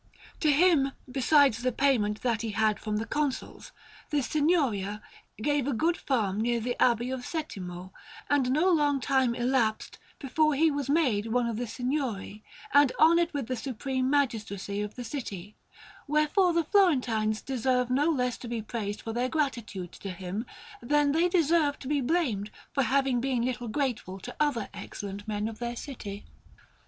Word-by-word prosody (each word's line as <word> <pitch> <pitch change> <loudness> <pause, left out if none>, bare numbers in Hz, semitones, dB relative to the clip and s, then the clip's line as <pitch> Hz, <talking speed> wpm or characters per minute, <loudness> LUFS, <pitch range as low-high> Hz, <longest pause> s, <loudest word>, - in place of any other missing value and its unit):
To 305 - +3
him, 290 -3 +4 0.2
besides 270 -2 +4
the 255 +1 +1
payment 225 -6 +1
that 235 -3 +1
he 230 - -3
had 215 0 +2
from 215 -1 -2
the 220 - -2
Consuls, 295 - -3 0.4
the 290 -2 +1
Signoria 265 - +1 0.4
gave 290 -1 +1
a 285 - 0
good 330 +9 +1
farm 215 - -1
near 235 +1 +1
the 245 +2 -2
Abbey 240 0 +3
of 260 - -2
Settimo, 185 - -6 0.4
and 280 -3 +2
no 305 +8 +3
long 290 -4 +2
time 260 -2 +1
elapsed 240 -3 0 0.2
before 305 +2 +1
he 320 +3 +4
was 285 -2 -3
made 255 -9 +2
one 245 +2 +1
of 230 -2 -2
the 245 +1 -3
Signori, 245 -4 -3 0.3
and 285 -2 +6
honoured 335 +2 +5
with 285 -5 -3
the 255 - -2
supreme 260 +2 -2
magistracy 215 -8 -1
of 210 0 -5
the 245 - -6
city; 210 -6 -6 0.5
wherefore 305 +5 +3
the 335 0 +2
Florentines 250 - +2
deserve 250 -1 0
no 290 +5 +3
less 250 -6 0
to 245 - -8
be 230 -2 -3
praised 210 -2 -4
for 225 - -4
their 245 +2 0
gratitude 235 - -2
to 200 - -8
him, 185 +5 -5 0.3
than 290 +3 +2
they 335 +4 +2
deserve 325 -4 +2
to 260 - -9
be 290 0 +1
blamed 245 - 0 0.2
for 275 - +2
having 265 0 +2
been 250 -2 0
little 245 -1 -3
grateful 225 -6 -2
to 245 +5 -9
other 285 -8 +1
excellent 200 0 -7
men 210 0 -1
of 225 -1 -7
their 240 0 -3
city. 210 -7 -7
250 Hz, 170 wpm, -28 LUFS, 220-290 Hz, 0.5 s, and